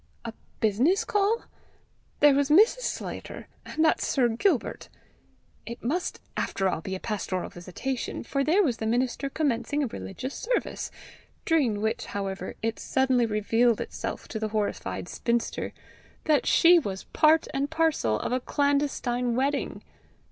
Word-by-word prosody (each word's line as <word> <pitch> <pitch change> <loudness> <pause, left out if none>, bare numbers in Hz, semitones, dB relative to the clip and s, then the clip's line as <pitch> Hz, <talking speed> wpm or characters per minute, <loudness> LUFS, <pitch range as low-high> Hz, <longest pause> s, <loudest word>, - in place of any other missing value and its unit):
A 230 - -4 0.3
business 240 - +2
call? 415 +3 +1 0.8
There 290 -1 +7
was 280 0 +2
Mrs. 425 +11 +6
Sclater! - - -5 0.2
and 315 +1 +1
that 315 - +3
Sir 250 -4 +2
Gilbert! 250 - 0 0.8
It 235 +1 -7
must 325 +10 -2 0.2
after 195 - 0
all 170 - -1
be 190 +3 -4
a - - -5
pastoral 195 -4 -3
visitation, 190 +9 -4
for 275 +3 -1
there 345 +8 +4
was 250 -9 0
the 220 - -3
minister 250 +4 0
commencing 290 0 0
a - - +1
religious 220 - -6
service! - - -2 0.6
during 260 - +2
which 220 +1 -1
however 195 -1 -4
it 225 0 -1
suddenly 260 -3 +2
revealed 225 +2 +2
itself - - -5
to 220 - -4
the 220 - -1
horrified 210 -4 -2
spinster 235 +3 -1 0.5
that 305 -2 +2
she 345 +1 +7
was 195 -9 -5
part 315 +1 +3
and 280 +1 -1
parcel 320 - +1
of - - -3
a 255 - +1
clandestine 265 -4 0
wedding! 275 +2 -1
255 Hz, 145 wpm, -27 LUFS, 220-300 Hz, 0.8 s, There